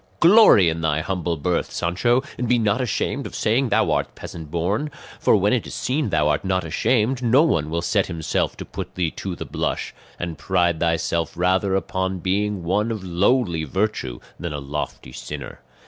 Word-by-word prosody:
"Glory 175 Hz, -, +7 dB
in 80 Hz, 0 st, 0 dB
thy 80 Hz, -1 st, +1 dB
humble 85 Hz, -2 st, -2 dB
birth, 85 Hz, +4 st, -1 dB
Sancho, 120 Hz, +10 st, +1 dB
and 125 Hz, -2 st, -3 dB
be 125 Hz, -, +4 dB
not 110 Hz, +1 st, +1 dB
ashamed 125 Hz, -, -1 dB
of -, -, -10 dB
saying 120 Hz, +4 st, +1 dB
thou -, -, +2 dB
art -, -, -1 dB
peasant 80 Hz, -3 st, -8 dB
born; 95 Hz, -, -1 dB, 0.3 s
for -, -, +4 dB
when -, -, +2 dB
it -, -, 0 dB
is -, -, -7 dB
seen 135 Hz, -1 st, -1 dB
thou 75 Hz, -4 st, +2 dB
art 75 Hz, 0 st, 0 dB
not 95 Hz, -1 st, 0 dB
ashamed 120 Hz, -, +1 dB
no 125 Hz, +5 st, +5 dB
one 80 Hz, -, +1 dB
will 85 Hz, +2 st, -2 dB
set 95 Hz, +3 st, +1 dB
himself 80 Hz, -3 st, -2 dB
to -, -, -7 dB
put -, -, -7 dB
thee 85 Hz, -3 st, 0 dB
to 95 Hz, -3 st, -5 dB
the -, -, -6 dB
blush; -, -, -3 dB, 0.2 s
and 85 Hz, -2 st, -5 dB
pride 85 Hz, -3 st, +1 dB
thyself 85 Hz, 0 st, 0 dB
rather 95 Hz, +2 st, +2 dB
upon 95 Hz, -1 st, -1 dB
being 100 Hz, +1 st, -1 dB
one 105 Hz, +6 st, +1 dB
of 110 Hz, -4 st, -4 dB
lowly 90 Hz, -1 st, +1 dB
virtue 85 Hz, -, -2 dB, 0.2 s
than 85 Hz, -3 st, -4 dB
a 75 Hz, -, -3 dB
lofty 70 Hz, -2 st, -5 dB
sinner. -, -, -7 dB
95 Hz, 190 wpm, -22 LUFS, 85-110 Hz, 0.3 s, Glory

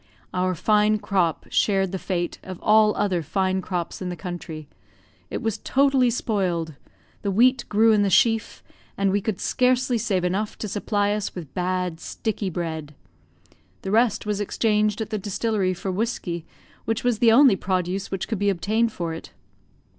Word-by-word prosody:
Our 185 Hz, 0 st, 0 dB
fine 210 Hz, +4 st, +3 dB
crop 185 Hz, -6 st, 0 dB
shared 195 Hz, -3 st, +2 dB
the 190 Hz, -, -3 dB
fate 175 Hz, -2 st, -3 dB
of 185 Hz, -2 st, -8 dB
all 215 Hz, 0 st, +5 dB
other 185 Hz, -4 st, 0 dB
fine 190 Hz, +4 st, 0 dB
crops 175 Hz, -1 st, -4 dB
in 185 Hz, -, -3 dB
the 175 Hz, -, -4 dB
country; 165 Hz, -4 st, -7 dB, 0.6 s
it -, -, -4 dB
was 225 Hz, -1 st, -1 dB
totally 270 Hz, -1 st, +3 dB
spoiled; 185 Hz, -9 st, -1 dB, 0.5 s
the 200 Hz, -, -2 dB
wheat 245 Hz, +7 st, +3 dB
grew 220 Hz, +2 st, +4 dB
in 210 Hz, -1 st, +4 dB
the 200 Hz, -, +2 dB
sheaf, 225 Hz, 0 st, +2 dB, 0.3 s
and 195 Hz, -1 st, +2 dB
we 200 Hz, +1 st, +1 dB
could 210 Hz, -2 st, -3 dB
scarcely 250 Hz, -1 st, +1 dB
save 200 Hz, -6 st, 0 dB
enough 195 Hz, +4 st, -1 dB
to 215 Hz, -, -4 dB
supply 205 Hz, 0 st, 0 dB
us 210 Hz, -1 st, -3 dB
with 165 Hz, -6 st, -8 dB
bad, 180 Hz, -2 st, -2 dB
sticky 210 Hz, 0 st, -3 dB
bread; 160 Hz, -4 st, -5 dB, 0.9 s
the 190 Hz, -, -3 dB
rest 225 Hz, -1 st, +2 dB
was 210 Hz, -1 st, -1 dB
exchanged 210 Hz, +1 st, +1 dB
at 220 Hz, -, -4 dB
the 215 Hz, -, -1 dB
distillery 200 Hz, -1 st, -1 dB
for 190 Hz, +2 st, -4 dB
whiskey, 180 Hz, -5 st, -3 dB, 0.4 s
which 225 Hz, 0 st, -1 dB
was 245 Hz, -3 st, +1 dB
the 230 Hz, -2 st, +5 dB
only 255 Hz, -2 st, +7 dB
produce 185 Hz, 0 st, -2 dB
which 195 Hz, -2 st, -3 dB
could 220 Hz, -4 st, -3 dB
be 205 Hz, 0 st, +2 dB
obtained 215 Hz, +5 st, +1 dB
for 170 Hz, -5 st, -4 dB
it. 160 Hz, -, -9 dB
200 Hz, 170 wpm, -24 LUFS, 180-220 Hz, 0.9 s, only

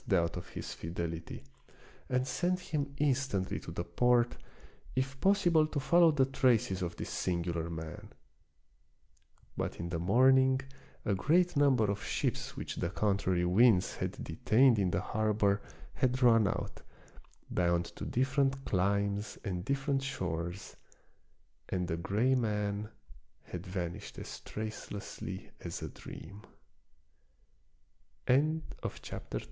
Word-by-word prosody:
25 95 Hz, -, +5 dB
doubt -, -, -10 dB
of 90 Hz, -, -7 dB
his -, -, -6 dB
fidelity, 85 Hz, -1 st, -5 dB, 0.7 s
and 125 Hz, +1 st, +1 dB
sent 180 Hz, +7 st, 0 dB
him 150 Hz, -6 st, -3 dB
instantly 135 Hz, -9 st, 0 dB
to -, -, -9 dB
the -, -, -3 dB
port, 120 Hz, -1 st, +2 dB, 0.6 s
if 135 Hz, +1 st, -2 dB
possible 175 Hz, -5 st, +4 dB
to 155 Hz, -, -2 dB
follow 170 Hz, +4 st, +5 dB
the 145 Hz, -4 st, +3 dB
traces 125 Hz, -8 st, +2 dB
of 85 Hz, -1 st, -3 dB
this -, -, -5 dB
singular 85 Hz, -2 st, -1 dB
man. 80 Hz, -1 st, -7 dB, 1.5 s
But -, -, -3 dB
in 85 Hz, +1 st, -3 dB
the 85 Hz, -1 st, -2 dB
morning 130 Hz, +7 st, +5 dB, 0.5 s
a 100 Hz, -, +2 dB
great 170 Hz, -, +3 dB
num 140 Hz, -2 st, +5 dB
ber 110 Hz, -3 st, +3 dB
of 100 Hz, -, -4 dB
ships -, -, -2 dB
which -, -, -5 dB
the 85 Hz, -, -1 dB
contrary 95 Hz, -3 st, +1 dB
winds 95 Hz, +1 st, +4 dB
had -, -, -2 dB
detained 115 Hz, +8 st, +4 dB
in 95 Hz, -2 st, +2 dB
the -, -, 0 dB
harbor 105 Hz, -2 st, +1 dB, 0.3 s
had 130 Hz, 0 st, +1 dB
run 115 Hz, -3 st, +6 dB
out, -, -, -3 dB, 0.7 s
bound 85 Hz, -1 st, +2 dB
to -, -, -7 dB
different 135 Hz, +1 st, +1 dB
climes 100 Hz, +2 st, 0 dB
and 90 Hz, -3 st, -2 dB
different 135 Hz, +3 st, 0 dB
shores, 90 Hz, -8 st, -4 dB, 0.9 s
and 90 Hz, -1 st, -1 dB
the 80 Hz, -, -1 dB
gray 105 Hz, +9 st, +1 dB
man 105 Hz, -3 st, 0 dB, 0.6 s
had 90 Hz, +2 st, -6 dB
vanished 90 Hz, +1 st, -5 dB
as -, -, -7 dB
tr 110 Hz, -, -7 dB
105 Hz, 120 wpm, -32 LUFS, 90-135 Hz, 1.5 s, run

